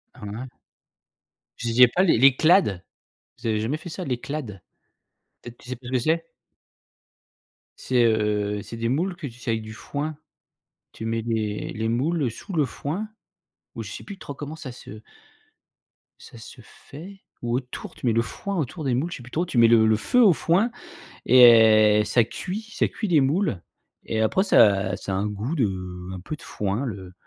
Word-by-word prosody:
Ah -, -, -16 dB
ouais. 110 Hz, +5 st, -6 dB, 1.1 s
Je 120 Hz, -, -4 dB
disais 125 Hz, +2 st, +7 dB
pas 180 Hz, +10 st, +1 dB
l'é 165 Hz, -, +4 dB
l'éclade. 135 Hz, -, +4 dB, 0.6 s
Vous -, -, -5 dB
avez 110 Hz, -1 st, +1 dB
jamais 125 Hz, +8 st, -1 dB
fait 155 Hz, +3 st, -10 dB
ça 180 Hz, +3 st, -6 dB
l'éclade? 125 Hz, -, -5 dB, 0.8 s
Peut-être, 120 Hz, 0 st, -11 dB
tu -, -, -15 dB
sais 125 Hz, -, -3 dB
pas 125 Hz, -, -16 dB
ce 130 Hz, -, -7 dB
que 130 Hz, -, +3 dB
c'est? 165 Hz, +5 st, 0 dB, 1.5 s
C'est, 125 Hz, -2 st, +1 dB
heu, 105 Hz, -2 st, 0 dB
c'est 115 Hz, -, -9 dB
des 115 Hz, 0 st, -2 dB
moules 175 Hz, +8 st, -1 dB
que, 175 Hz, -, -8 dB
tu 120 Hz, -1 st, -12 dB
sais, 120 Hz, -, -6 dB
avec 110 Hz, -1 st, -2 dB
du 110 Hz, 0 st, -9 dB
foin, 145 Hz, +6 st, -5 dB, 0.8 s
tu 110 Hz, -, -7 dB
mets 115 Hz, 0 st, -1 dB
les 110 Hz, -2 st, -3 dB
les 110 Hz, 0 st, -2 dB
moules 135 Hz, +2 st, 0 dB
sous 195 Hz, -, -9 dB
le 155 Hz, -4 st, +2 dB
foin 170 Hz, -, -5 dB, 0.7 s
ou 115 Hz, -, -5 dB
je 105 Hz, -, -8 dB
sais -, -, -8 dB
plus 200 Hz, -2 st, -10 dB
trop 145 Hz, -, -8 dB
comment 145 Hz, +2 st, -7 dB
ça 155 Hz, -6 st, -8 dB
se 110 Hz, -3 st, -11 dB, 1.2 s
ça 120 Hz, -, -14 dB
se 120 Hz, +3 st, -12 dB
fait. 180 Hz, -, -13 dB, 0.2 s
Ou 120 Hz, 0 st, -1 dB
autour, 125 Hz, -1 st, -6 dB
tu -, -, -8 dB
mets 120 Hz, -, +3 dB
le 115 Hz, -, +3 dB
foin 195 Hz, -, -5 dB
autour 155 Hz, +2 st, -3 dB
des 130 Hz, -, +1 dB
moules. 150 Hz, +8 st, -1 dB
Je -, -, -5 dB
sais 125 Hz, -, -12 dB
plus 125 Hz, -, -14 dB
trop. 170 Hz, +3 st, -1 dB
Tu 130 Hz, -, -4 dB
mets 115 Hz, -, +7 dB
le 115 Hz, -1 st, +5 dB
le 110 Hz, 0 st, +4 dB
feu 250 Hz, -, +2 dB
au 200 Hz, -, +7 dB
foin 185 Hz, +9 st, +1 dB, 0.5 s
et 110 Hz, -4 st, +7 dB
ça 115 Hz, +2 st, +3 dB
cuit 190 Hz, -, -5 dB
ça -, -, 0 dB
cuit 215 Hz, -, -4 dB
les 160 Hz, -5 st, +4 dB
moules. 140 Hz, -, 0 dB, 0.4 s
Et 110 Hz, -, -3 dB
après, 110 Hz, -, +2 dB
ça 100 Hz, -, +4 dB
ça 95 Hz, -, -5 dB
a -, -, 0 dB
un 100 Hz, +2 st, -1 dB
goût 105 Hz, +9 st, -4 dB
de 95 Hz, -, -3 dB
un 95 Hz, -, -6 dB
peu 125 Hz, +12 st, -6 dB
de 155 Hz, -, -17 dB
foin 105 Hz, +5 st, -3 dB
le 95 Hz, -6 st, -7 dB
120 Hz, 200 wpm, -24 LUFS, 110-155 Hz, 1.5 s, disais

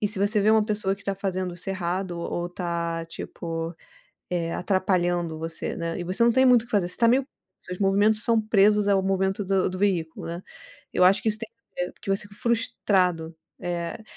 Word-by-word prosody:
e 210 Hz, -, +2 dB
se 205 Hz, -2 st, -3 dB
você 205 Hz, +1 st, +2 dB
vê 210 Hz, +2 st, +4 dB
uma 220 Hz, -1 st, +5 dB
pessoa 210 Hz, -2 st, 0 dB
que 205 Hz, -, -17 dB
tá 195 Hz, -, -1 dB
fazendo 185 Hz, -2 st, -3 dB
isso 180 Hz, +3 st, -8 dB
errado 180 Hz, -1 st, -2 dB
ou 175 Hz, +1 st, -3 dB
tá, 170 Hz, -2 st, -3 dB
tipo, 165 Hz, 0 st, -5 dB, 0.6 s
eh, 170 Hz, -2 st, -1 dB
atrapalhando 175 Hz, -3 st, 0 dB
você, 165 Hz, 0 st, -4 dB
né, 170 Hz, 0 st, -3 dB
e -, -, -3 dB
você 185 Hz, +6 st, 0 dB
não 235 Hz, -, +5 dB
tem 260 Hz, +2 st, +4 dB
muito 245 Hz, -2 st, +6 dB
o -, -, -14 dB
que 240 Hz, -, -19 dB
fazer, 195 Hz, -4 st, +2 dB
você 180 Hz, -, -4 dB
tá 230 Hz, -, +4 dB
meio 260 Hz, +3 st, +3 dB, 0.3 s
seus 180 Hz, 0 st, -7 dB
movimentos 205 Hz, +2 st, +3 dB
são 230 Hz, -2 st, +3 dB
presos 210 Hz, -1 st, +4 dB
ao 195 Hz, -1 st, +4 dB
movimento 190 Hz, +1 st, 0 dB
do 195 Hz, -1 st, +2 dB
do 185 Hz, -, -5 dB
veículo, 175 Hz, -5 st, 0 dB
né. 170 Hz, +2 st, -5 dB, 0.5 s
Eu -, -, +3 dB
acho 195 Hz, +3 st, +5 dB
que -, -, -1 dB
isso 215 Hz, 0 st, -3 dB
tem 225 Hz, -1 st, -6 dB
a 200 Hz, -6 st, -6 dB
ver, -, -, -9 dB
que -, -, -7 dB
você 195 Hz, +1 st, +1 dB
fica 200 Hz, -1 st, -14 dB
frustrado. 180 Hz, -8 st, 0 dB, 0.3 s
Eh, 175 Hz, +3 st, -3 dB
190 Hz, 215 wpm, -25 LUFS, 175-210 Hz, 0.6 s, muito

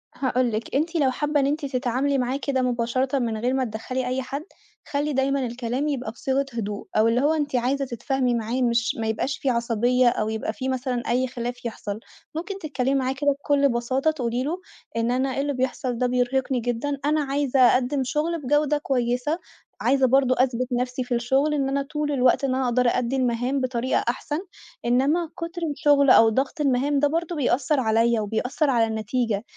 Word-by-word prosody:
هاقول 250 Hz, -1 st, 0 dB
لِك 220 Hz, +3 st, -4 dB
أنتِ 325 Hz, +5 st, 0 dB
لو 280 Hz, -5 st, +3 dB
حابة 295 Hz, +3 st, 0 dB
إن 275 Hz, -, +2 dB
أنتِ 295 Hz, +1 st, -1 dB
تتعاملي 265 Hz, +1 st, 0 dB
معاه 255 Hz, +1 st, 0 dB
كده 280 Hz, -2 st, -1 dB
مباشرةً 255 Hz, +2 st, 0 dB
من 230 Hz, -3 st, -1 dB
غير 245 Hz, +4 st, 0 dB
ما 265 Hz, 0 st, +1 dB
تدخّلي 250 Hz, +3 st, -4 dB
أي 255 Hz, +1 st, -1 dB
حد، 275 Hz, +3 st, -5 dB, 0.5 s
خلّي 290 Hz, +1 st, 0 dB
دايمًا 270 Hz, 0 st, +1 dB
الكلام 245 Hz, +4 st, -2 dB
يبقى 255 Hz, -6 st, -2 dB
بصيغة 265 Hz, +4 st, -1 dB
هدوء، 210 Hz, -3 st, -4 dB
أو 215 Hz, +1 st, +5 dB
اللي 230 Hz, +2 st, +2 dB
هو 295 Hz, +3 st, +3 dB
أنتِ 295 Hz, -4 st, -1 dB
عايزة 265 Hz, +3 st, +1 dB
تتفاهمي 255 Hz, +1 st, -1 dB
معاه 235 Hz, +3 st, -2 dB
مش 235 Hz, -1 st, +1 dB
ما 225 Hz, -, -1 dB
يبقاش 225 Hz, +5 st, -1 dB
في 275 Hz, -, -1 dB
عصبية 240 Hz, +1 st, +2 dB
أو 215 Hz, -2 st, -1 dB
يبقى 220 Hz, 0 st, -3 dB
في 260 Hz, +3 st, -4 dB
مثلًا 255 Hz, -2 st, -2 dB
أي 255 Hz, +2 st, +1 dB
خلاف 245 Hz, -1 st, -5 dB
يحصل، 215 Hz, -2 st, -4 dB, 0.4 s
ممكن 385 Hz, +5 st, -4 dB
تتكلّمي 275 Hz, -5 st, -1 dB
معاه 260 Hz, -1 st, 0 dB
كده 285 Hz, +1 st, +1 dB
بكُلّ 280 Hz, 0 st, +2 dB
بساطة 260 Hz, +5 st, +1 dB
تقولي 245 Hz, -4 st, -2 dB
له 325 Hz, +6 st, -2 dB, 0.4 s
إن 230 Hz, +1 st, +1 dB
أنا 260 Hz, +1 st, 0 dB
إيه 275 Hz, -, 0 dB
اللي 285 Hz, 0 st, -1 dB
بيحصل 255 Hz, -1 st, -2 dB
ده 250 Hz, +1 st, +1 dB
بيرهقني 250 Hz, +1 st, 0 dB
جدًا، 245 Hz, +4 st, -2 dB
أنا 305 Hz, +1 st, +2 dB
عايزة 275 Hz, -1 st, 0 dB
أقدِّم 255 Hz, +2 st, +4 dB
شغل 310 Hz, +6 st, -1 dB
بجودة 295 Hz, +2 st, +2 dB
كويسة، 255 Hz, +3 st, -1 dB, 0.4 s
عايزة 270 Hz, -1 st, +3 dB
برضه 260 Hz, 0 st, +3 dB
أثبت 255 Hz, -1 st, +1 dB
نفسي 250 Hz, +1 st, -1 dB
في 245 Hz, -, -3 dB
الشغل 265 Hz, +5 st, +1 dB
إن 275 Hz, -2 st, 0 dB
أنا 280 Hz, +1 st, 0 dB
طول 300 Hz, +1 st, -3 dB
الوقت 255 Hz, -1 st, +3 dB
إن 260 Hz, -2 st, +1 dB
أنا 260 Hz, 0 st, 0 dB
أقدر 250 Hz, 0 st, +2 dB
أأدّي 245 Hz, +1 st, 0 dB
المهام 255 Hz, +1 st, 0 dB
بطريقة 255 Hz, 0 st, 0 dB
أحسن، 295 Hz, +5 st, -2 dB, 0.5 s
إنّما 280 Hz, +8 st, +2 dB
كُتر 335 Hz, +1 st, -5 dB
الشغل 285 Hz, -1 st, +3 dB
أو 225 Hz, -2 st, +7 dB
ضغط 265 Hz, +7 st, -1 dB
المهام 280 Hz, +1 st, +2 dB
ده 290 Hz, -, +4 dB
برضه 335 Hz, +3 st, -2 dB
بيأثّر 280 Hz, 0 st, +1 dB
عليَّ، 230 Hz, 0 st, +2 dB
وبيأثّر 235 Hz, +8 st, -1 dB
على 235 Hz, -4 st, +3 dB
النتيجة، 220 Hz, 0 st, -1 dB
260 Hz, 190 wpm, -24 LUFS, 240-280 Hz, 0.5 s, أو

